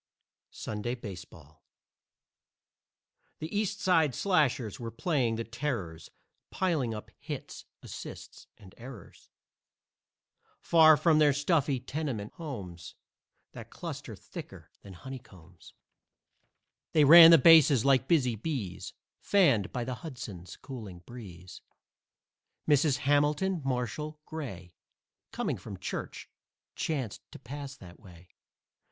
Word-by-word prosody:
SUNDAY 110 +3 -4
BASEBALL 85 - -11 1.7
The 160 +6 -6
East 210 0 -1
Side 160 - +2
Slashers 140 - +1
were 115 -1 -5
playing 125 -2 0
the 115 - -3
Terrors, 115 - -5 0.4
Piling 160 -11 0
up 105 -1 -8
hits, - - -7 0.2
assists - - -10
and 95 -2 -16
errors; 120 -5 -12 1.3
Far 160 -2 +6
from 160 -1 +3
their 150 -2 +5
stuffy 145 -2 +1
tenement 130 -6 -4
homes 95 - -8 0.6
That - - -10
cluster - - -7
thicker - - -11
than 100 - -12
honeycombs, 95 -7 -12 1.2
They 155 - +5
ran 165 +3 +11
the 165 - +9
bases 150 -5 +6
like 135 -1 +3
busy 125 -8 +2
bees, 110 - -5 0.3
Fanned 140 - +3
by 125 - -3
the 130 +1 -4
Hudson's 105 - -8
cooling 105 -10 -9
breeze. 95 -7 -11 1.1
Mrs. 145 -2 +3
Hamilton 150 +6 +2
Marshall 135 +4 -3
Gray, 95 - -7 0.6
Coming - - -2
from - - -9
church, - - -6 0.5
chanced 145 - -3
to - - -10
pass 140 +2 -8
that 90 -8 -14
way. 90 -4 -16
130 Hz, 110 wpm, -29 LUFS, 105-155 Hz, 1.7 s, ran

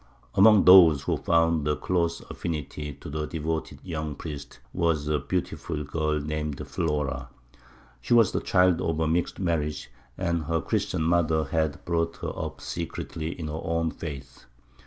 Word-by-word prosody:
Among 105 +1 +6
those 85 -6 +8
who - - 0
found 80 -2 +2
a 75 - +2
close 85 -1 -1
affinity 75 -3 -5
to 70 - -12
the 75 +1 -3
devoted 80 0 -3
young 80 -4 -4
priest, 70 -3 -8 0.2
was 80 -4 0
a 75 -1 +1
beautiful 80 0 -3
girl 75 +1 -1
named 75 -1 -3
Flora. 70 -5 -2 0.7
She 90 - +2
was 115 -5 +5
the - - -1
child 90 -2 +3
of 80 -1 -1
a 80 - +1
mixed 85 +2 0
marriage, 80 -7 -2 0.3
and 85 -3 -1
her 80 +1 0
Christian 80 - -1
mother 80 -1 +2
had 80 0 -1
brought 85 -1 0
her - - -2
up - - -5
secretly 85 -1 -5
in 80 - -4
her 75 +2 -4
own 85 -1 0
faith. 70 -4 -8
80 Hz, 155 wpm, -26 LUFS, 75-85 Hz, 0.7 s, those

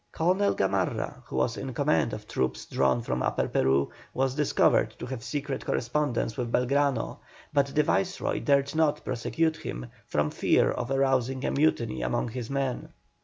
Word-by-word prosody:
Colonel 185 +5 +2
Gamarra, 95 -1 -1
who - - -7
was 65 0 +1
in - - -5
command - - +2
of - - -7
troops 65 0 -2
drawn 70 - +1
from 65 - -2
Upper - - 0
Peru, 65 +1 +2 0.2
was 135 0 +1
discovered 150 0 +2
to - - -6
have 125 -2 -6
secret 140 -2 -3
correspondence 120 -3 -1
with 120 -2 -2
Belgrano, 140 +2 +1 0.3
but 140 -1 +3
the 150 +2 +2
Viceroy 190 +5 0
dared 140 -1 +2
not 155 -2 +1
prosecute 160 +6 0
him 60 - -6 0.2
from 75 0 0
fear - - +3
of 120 0 -3
arousing 135 -1 +1
a - - +1
mutiny 120 - +1
among - - -1
his 120 0 -5
men. 135 -2 -2
130 Hz, 165 wpm, -28 LUFS, 110-145 Hz, 0.3 s, but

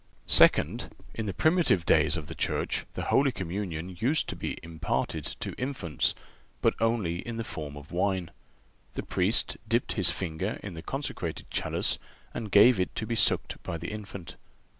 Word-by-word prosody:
Second—In 110 -2 +3
the - - 0
primitive 160 - +3
days 80 +1 +4
of 80 - -5
the - - -7
Church - - -1
the - - -4
Holy 135 0 +5
Communion 90 -3 -4
used 135 +8 +2
to - - -3
be - - -4
imparted 80 -1 -2 0.2
to - - -3
infants, 125 - -1 0.4
but - - +3
only 115 -7 +1
in 115 +3 -5
the 115 - -2
form 75 -9 -6
of 75 +1 -12
wine. 90 -1 0 0.6
The - - -3
Priest 95 +5 +1
dipped 115 +2 +1
his 95 - +3
finger 95 +4 -2
in 100 - -6
the 80 - -7
consecrated 135 - -4
chalice - - +1 0.3
and 110 - -4
gave 105 +3 +7
it 90 - -1
to 110 - -2
be 115 - -2
sucked 115 - +2
by 85 - -4
the 85 - -5
infant. 100 -4 -8
95 Hz, 165 wpm, -28 LUFS, 85-115 Hz, 0.6 s, gave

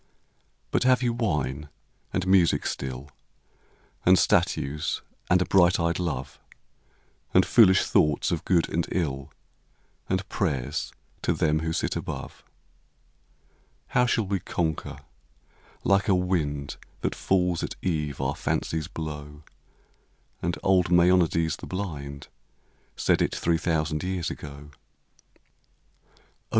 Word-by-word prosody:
But - - +1
have 130 0 +4
you 120 -1 +1
wine 75 - -2 0.4
and 95 - -1
music 95 -3 +3
still, 65 +2 -4 0.9
And 95 +1 +6
statues 75 -3 +1 0.3
and 90 - +5
a - - -7
bright 90 -2 +4
eyed 85 +1 0
love, 70 -7 -3 1.0
And 95 - +6
foolish 95 -6 +6
thoughts 75 +3 +2
of 85 - -1
good 85 -3 +2
and 85 0 -1
ill, 70 -7 -2 0.8
And 95 +1 -1
prayers 70 -14 -2 0.3
to - - +1
them 75 0 +1
who 80 0 -2
sit - - -1
above? - - -6 1.5
How 125 0 +3
shall 115 -2 +1
we 95 0 -1
conquer? 80 -2 -3 0.9
Like 100 0 +3
a 95 - +4
wind 80 -6 -1 0.2
That - - -1
falls 90 -3 +1
at - - -4
eve 75 -6 -1
our 70 +1 -1
fancies 80 -1 -2
blow, 75 -2 -5
v*iA 75 - -13
j. - - -17 1.0
And 85 0 -1
old 95 -2 +3
Maeonides 85 -2 +3
the - - -9
blind 70 -7 -5 0.7
Said - - +2
it - - 0
three 85 -1 +1
thousand 75 -2 0
years 90 -2 -2
ago. 75 0 -9
85 Hz, 125 wpm, -26 LUFS, 75-95 Hz, 1.5 s, And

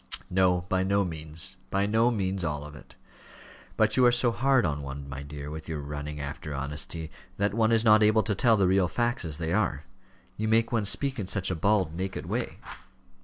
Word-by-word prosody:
"No, 90 -1 +3
by 95 +1 -1
no 100 +1 +2
means, 80 +3 -5
by 100 +1 +1
no 110 +3 +3
means 95 -5 -1
all 75 -2 -2
of 75 0 -10
it. 75 - -15 0.8
But - - +3
you 130 - +6
are - - +5
so 120 0 +4
hard 130 -1 +2
on 75 -2 -1
one, 70 0 -7
my 70 0 -6
dear, 70 0 -7
with 80 +1 -8
your 80 -2 -3
running 75 +1 -6
after 75 +1 -5
honesty, 75 +3 -4 0.3
that 100 0 0
one 110 0 +2
is 115 0 +3
not 110 0 +6
able 110 +1 +4
to 110 - 0
tell 115 +3 +3
the 100 - +3
real 95 -1 +3
facts 120 +1 -1
as 80 -3 -4
they 80 0 -2
are. 95 -9 0 0.5
You 110 - -1
make 115 +1 +3
one 115 -3 +1
speak 135 +5 -1
in 100 - -3
such 95 -1 -1
a - - -1
bald, 95 -1 +1
naked 95 +2 -4
way." - - -3
95 Hz, 215 wpm, -27 LUFS, 75-110 Hz, 0.8 s, you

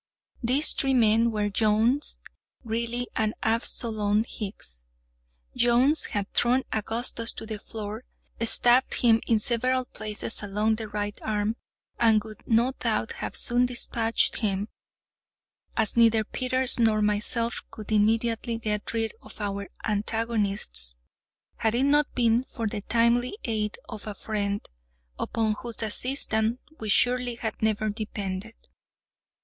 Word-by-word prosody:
These 265 +5 +4
three 270 -2 +2
men 230 0 +4
were—Jones, 215 +5 +1 0.4
Greely, 235 +2 -2
and 215 0 0
Absolom 220 -2 0
Hicks. 190 - -6 0.7
Jones 245 +6 +4
had 205 -1 -4
thrown 250 +2 +2
Augustus 230 +1 0
to - - -7
the 215 -1 -6
floor, 215 +2 -7 0.4
stabbed 240 +3 +5
him 230 -2 +3
in 230 - +3
several 255 +3 +1
places 215 -1 +1
along 210 +2 0
the 220 -1 -6
right 205 0 -4
arm, 215 0 -1 0.4
and 220 -3 +4
would 215 -1 -12
no 235 +3 +3
doubt - - -1
have - - -6
soon 245 0 +3
dispatched 230 -2 +1
him 205 -1 -1 1.1
(as 220 -3 +4
neither 230 -2 +4
Peters 255 +3 +2
nor 220 -2 +3
myself 220 +3 0
could 215 0 -10
immediately 225 +2 +1
get 210 -2 -3
rid 225 -1 -1
of - - -11
our 200 -1 -3
own - - -14 0.2
antagonists), 205 - 0 0.6
had 220 0 0
it 250 - +1
not 290 +1 +3
been 235 0 +2
for 230 -4 -6
the 205 -1 -3
timely 235 - +1
aid 215 -3 -2
of 220 -2 -8
a 210 - -5
friend, 205 -1 -3 0.5
upon 220 -1 0
whose 235 -1 -1
assistance 225 0 +1 0.2
we, 220 - -5
surely, 245 +2 +2
had 225 -1 -5
never 215 0 0
depended. 205 0 -5
225 Hz, 130 wpm, -26 LUFS, 210-235 Hz, 1.1 s, stabbed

